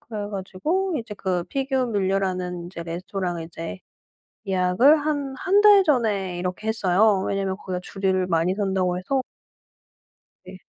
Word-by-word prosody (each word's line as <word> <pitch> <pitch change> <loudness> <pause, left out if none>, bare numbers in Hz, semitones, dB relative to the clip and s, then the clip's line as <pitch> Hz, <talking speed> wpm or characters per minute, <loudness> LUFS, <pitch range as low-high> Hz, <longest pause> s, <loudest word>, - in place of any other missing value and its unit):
그래 210 -3 -6
가지고 305 - -2
이제 225 -3 -7
그 185 -3 -2
피그뮐러라는 195 -8 -1
이제 170 -2 -7
레스토랑을 175 0 -4
이제 165 - -7 0.7
예약을 190 +10 +4
한 285 -3 -2
1 390 +1 +3
달 410 -2 +7
전에 210 - +1
이렇게 180 +4 -4
했어요. 200 -1 +3
왜냐면 195 -1 -1
거기가 185 -2 -4
줄을 190 -2 -1
많이 170 +2 +1
선다고 190 -3 0
해서. 260 +9 -1 1.2
네. 185 0 -11
195 Hz, 290 characters per minute, -24 LUFS, 180-235 Hz, 1.2 s, 달